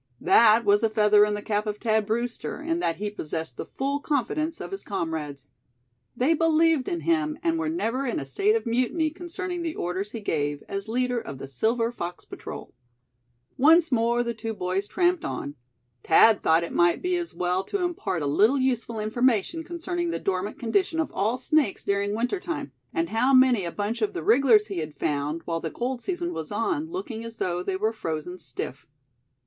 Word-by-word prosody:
That 230 Hz, -, +5 dB
was 205 Hz, 0 st, +4 dB
a 225 Hz, -, +2 dB
feather 210 Hz, -1 st, +5 dB
in 210 Hz, 0 st, -1 dB
the 205 Hz, -, -6 dB
cap 210 Hz, 0 st, -1 dB
of 210 Hz, 0 st, -2 dB
Thad 220 Hz, -2 st, +1 dB
Brewster, 235 Hz, +5 st, -2 dB
in 330 Hz, +2 st, -1 dB
that 165 Hz, -, 0 dB
he 210 Hz, +1 st, -4 dB
possessed 160 Hz, -7 st, -4 dB
the -, -, -6 dB
full 280 Hz, +2 st, -2 dB
confidence 305 Hz, +3 st, -1 dB
of -, -, -7 dB
his 390 Hz, -, -4 dB
comrades. 155 Hz, -7 st, -4 dB, 0.7 s
They 265 Hz, +7 st, +3 dB
believed 325 Hz, -3 st, +3 dB
in 345 Hz, -2 st, -2 dB
him, 310 Hz, -2 st, +1 dB
and 330 Hz, -1 st, +1 dB
were 315 Hz, -1 st, -1 dB
never 270 Hz, -5 st, -1 dB
in 240 Hz, -, -1 dB
a 135 Hz, -, -5 dB
state 405 Hz, -, +2 dB
of 455 Hz, -, -1 dB
mutiny 255 Hz, +7 st, +1 dB
concerning 350 Hz, +1 st, -5 dB
the 330 Hz, -2 st, -3 dB
orders 185 Hz, +4 st, -2 dB
he 230 Hz, -, -5 dB
gave, 145 Hz, -7 st, -2 dB
as 195 Hz, +1 st, -4 dB
leader 250 Hz, +1 st, 0 dB
of 140 Hz, -11 st, -8 dB
the 135 Hz, -, -7 dB
Silver 230 Hz, -, 0 dB
Fox 175 Hz, -6 st, -6 dB
Patrol. -, -, -9 dB, 0.9 s
Once 320 Hz, +4 st, +6 dB
more 235 Hz, 0 st, +2 dB
the 235 Hz, 0 st, -2 dB
two 225 Hz, 0 st, -5 dB
boys 185 Hz, +1 st, -2 dB
tramped 355 Hz, -, +1 dB
on. 145 Hz, -, -4 dB, 0.5 s
Thad 215 Hz, +6 st, +6 dB
thought 160 Hz, +1 st, +3 dB
it 170 Hz, -, -5 dB
might 175 Hz, 0 st, +3 dB
be 360 Hz, 0 st, +1 dB
as 345 Hz, -1 st, -5 dB
well 180 Hz, +1 st, 0 dB
to 400 Hz, -3 st, -2 dB
impart 325 Hz, -, -2 dB
a -, -, -1 dB
little 210 Hz, -, +3 dB
useful 245 Hz, -4 st, -1 dB
information 240 Hz, -, +1 dB
concerning 345 Hz, +1 st, -3 dB
the -, -, -1 dB
dormant 195 Hz, +1 st, -2 dB
condition 325 Hz, -, 0 dB
of 320 Hz, -, -1 dB
all 220 Hz, +5 st, 0 dB
snakes 260 Hz, -3 st, +1 dB
during 200 Hz, +1 st, 0 dB
winter 245 Hz, -, -1 dB
time; 315 Hz, -6 st, -5 dB, 0.2 s
and 335 Hz, -2 st, -1 dB
how 255 Hz, +4 st, +3 dB
many 255 Hz, -7 st, +5 dB
a 170 Hz, -, -3 dB
bunch 210 Hz, +5 st, -3 dB
of 215 Hz, -, 0 dB
the -, -, -4 dB
wrigglers 230 Hz, -, +5 dB
he 200 Hz, -5 st, -4 dB
had 155 Hz, -2 st, -6 dB
found, 150 Hz, +2 st, -2 dB
while 165 Hz, -1 st, -2 dB
the 165 Hz, -, -4 dB
cold 245 Hz, +6 st, -3 dB
season 350 Hz, 0 st, -3 dB
was -, -, -6 dB
on, 320 Hz, -5 st, -1 dB
looking 325 Hz, -, -5 dB
as 230 Hz, 0 st, -8 dB
though 175 Hz, -1 st, -1 dB
they 190 Hz, +1 st, -2 dB
were 215 Hz, +4 st, 0 dB
frozen 170 Hz, -2 st, -5 dB
stiff. 130 Hz, 0 st, -6 dB
230 Hz, 200 wpm, -26 LUFS, 195-315 Hz, 0.9 s, Once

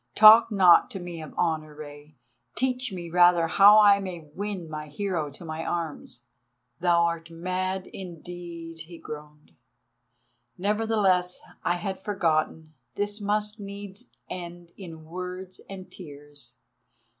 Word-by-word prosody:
Talk 220 Hz, +2 st, +9 dB
not 185 Hz, -4 st, +6 dB
to 195 Hz, -, -6 dB
me 175 Hz, -2 st, -7 dB
of 155 Hz, -, -9 dB
honour, 155 Hz, -3 st, -1 dB
Rei, 145 Hz, -1 st, -11 dB, 0.4 s
teach 255 Hz, -2 st, -1 dB
me 175 Hz, -3 st, -7 dB
rather 175 Hz, -1 st, +5 dB
how 200 Hz, +5 st, +7 dB
I 205 Hz, -1 st, +7 dB
may 175 Hz, -6 st, -7 dB
win 200 Hz, -3 st, -4 dB
my 155 Hz, -1 st, -6 dB
hero 165 Hz, -1 st, -2 dB
to 145 Hz, +5 st, -12 dB
my 160 Hz, 0 st, -5 dB
arms." 160 Hz, -8 st, -4 dB, 0.6 s
"Thou 175 Hz, -1 st, +3 dB
art 170 Hz, 0 st, -2 dB
mad 185 Hz, +3 st, -3 dB
indeed," 170 Hz, -2 st, -9 dB
he 170 Hz, -1 st, -10 dB
groaned; 150 Hz, -, -10 dB, 1.1 s
"nevertheless—I 195 Hz, -4 st, 0 dB
had 190 Hz, +2 st, -4 dB
forgotten—this 175 Hz, +2 st, -2 dB
must 210 Hz, +1 st, -1 dB
needs 200 Hz, 0 st, -8 dB, 0.2 s
end 175 Hz, -1 st, -8 dB
in 165 Hz, -5 st, -10 dB
words 180 Hz, +2 st, -7 dB
and 190 Hz, -1 st, -9 dB
tears. 145 Hz, -6 st, -11 dB
175 Hz, 120 wpm, -26 LUFS, 160-195 Hz, 1.1 s, Talk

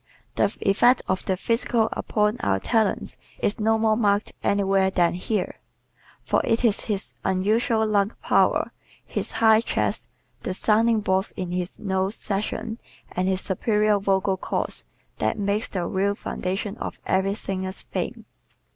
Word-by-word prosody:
The -, -, +1 dB
effect 240 Hz, +6 st, +4 dB
of 190 Hz, -, -1 dB
the 190 Hz, -, 0 dB
physical 230 Hz, +1 st, +1 dB
upon 210 Hz, +1 st, 0 dB
our 95 Hz, -1 st, +1 dB
talents 220 Hz, -, 0 dB, 0.2 s
is 205 Hz, -, 0 dB
no 220 Hz, +1 st, +3 dB
more 220 Hz, -1 st, +3 dB
marked 205 Hz, -2 st, +1 dB
anywhere 195 Hz, -1 st, +2 dB
than 175 Hz, -3 st, +2 dB
here. 185 Hz, +2 st, -2 dB, 0.6 s
For -, -, +2 dB
it 230 Hz, +2 st, +1 dB
is 215 Hz, -3 st, +2 dB
his 205 Hz, -3 st, -2 dB
unusual 220 Hz, +4 st, +2 dB
lung 205 Hz, 0 st, +1 dB
power, -, -, +3 dB, 0.3 s
his -, -, -2 dB
high 220 Hz, -1 st, +5 dB
chest, -, -, -1 dB, 0.3 s
the 185 Hz, -, -3 dB
sounding 220 Hz, +2 st, +3 dB
boards 190 Hz, -1 st, 0 dB
in 180 Hz, -2 st, -3 dB
his 180 Hz, 0 st, -3 dB
nose 190 Hz, 0 st, -1 dB
section 215 Hz, +2 st, -2 dB, 0.3 s
and 180 Hz, +1 st, -1 dB
his 190 Hz, 0 st, +1 dB
superior 210 Hz, +1 st, +1 dB
vocal 195 Hz, -1 st, +1 dB
cords -, -, -2 dB, 0.3 s
that -, -, 0 dB
make 205 Hz, +1 st, 0 dB
the 180 Hz, -3 st, -2 dB
real 195 Hz, +3 st, 0 dB
foundation 195 Hz, +1 st, -3 dB
of -, -, -5 dB
every 190 Hz, +1 st, +1 dB
singer's 190 Hz, -2 st, -3 dB
fame. -, -, -4 dB
200 Hz, 145 wpm, -24 LUFS, 190-220 Hz, 0.6 s, high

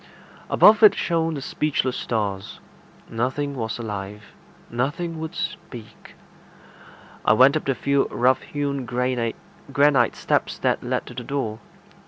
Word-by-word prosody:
Above 215 Hz, +1 st, +6 dB
it 215 Hz, -, +8 dB
shone 165 Hz, -2 st, 0 dB
the 140 Hz, -, -5 dB
speechless 135 Hz, -4 st, -1 dB
stars. 100 Hz, -4 st, -3 dB, 0.5 s
Nothing 130 Hz, +5 st, -2 dB
was 110 Hz, -3 st, -3 dB
alive. 105 Hz, -2 st, -7 dB, 0.3 s
Nothing 160 Hz, +7 st, -3 dB
would 160 Hz, +2 st, -6 dB
speak. 120 Hz, -9 st, -7 dB, 1.1 s
I -, -, +5 dB
went 130 Hz, +6 st, +6 dB
up 155 Hz, -, -2 dB
the 135 Hz, -, 0 dB
few 140 Hz, +1 st, +1 dB
rough 125 Hz, +2 st, +2 dB
hewn 140 Hz, -2 st, -3 dB
granite 125 Hz, -1 st, -1 dB, 0.8 s
steps -, -, -1 dB
that -, -, 0 dB
led -, -, -2 dB
to -, -, -10 dB
the 120 Hz, 0 st, -6 dB
door. 115 Hz, -5 st, -3 dB
130 Hz, 130 wpm, -23 LUFS, 115-145 Hz, 1.1 s, it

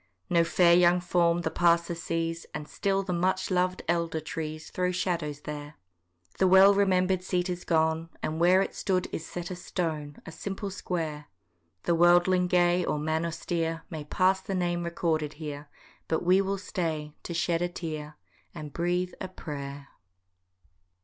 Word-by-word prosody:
No 170 Hz, -1 st, +5 dB
fair 170 Hz, +1 st, +4 dB
young 175 Hz, 0 st, +5 dB
form 175 Hz, -1 st, +2 dB
the -, -, -2 dB
passer 170 Hz, 0 st, +3 dB
sees, 165 Hz, 0 st, -3 dB
And 150 Hz, -, -5 dB
still 195 Hz, -1 st, 0 dB
the 185 Hz, -2 st, -3 dB
much 185 Hz, +2 st, 0 dB
lov'd 185 Hz, 0 st, +1 dB
elder 170 Hz, -2 st, 0 dB
trees 155 Hz, 0 st, -6 dB
Throw 180 Hz, 0 st, 0 dB
shadows 170 Hz, -5 st, -2 dB
there. 150 Hz, 0 st, -7 dB, 0.6 s
The 190 Hz, -, +5 dB
well 190 Hz, +2 st, +8 dB
remember'd 190 Hz, -2 st, +2 dB
seat 180 Hz, 0 st, -1 dB
is 180 Hz, 0 st, -5 dB
gone, 160 Hz, 0 st, +1 dB
And 155 Hz, +1 st, -2 dB
where 180 Hz, +3 st, +5 dB
it -, -, -6 dB
stood 185 Hz, -2 st, 0 dB
is 165 Hz, -, -5 dB
set 175 Hz, 0 st, -6 dB
a -, -, -3 dB
stone, 160 Hz, -5 st, -4 dB
A -, -, -8 dB
simple 195 Hz, +3 st, -5 dB
square: 160 Hz, -6 st, -4 dB, 0.6 s
The 170 Hz, -, +2 dB
worlding 175 Hz, +2 st, +4 dB
gay, 175 Hz, 0 st, +3 dB
or 150 Hz, -, -1 dB
man 160 Hz, +2 st, -1 dB
austere, 165 Hz, 0 st, -2 dB
May 155 Hz, -2 st, -5 dB
pass 185 Hz, +5 st, +2 dB
the 195 Hz, -, -4 dB
name 175 Hz, -1 st, 0 dB
recorded 160 Hz, -3 st, -1 dB
here, 145 Hz, -1 st, -7 dB, 0.4 s
But 160 Hz, -, 0 dB
we 185 Hz, +2 st, +5 dB
will 195 Hz, 0 st, -1 dB
stay 160 Hz, -6 st, -3 dB
to 170 Hz, -, -6 dB
shed 170 Hz, 0 st, +1 dB
a 175 Hz, -, 0 dB
tear, 155 Hz, -3 st, -6 dB, 0.4 s
And 150 Hz, -3 st, -7 dB
breathe 180 Hz, +1 st, -1 dB
a 190 Hz, -, -3 dB
prayer. 140 Hz, -5 st, -7 dB
170 Hz, 165 wpm, -28 LUFS, 160-180 Hz, 0.6 s, well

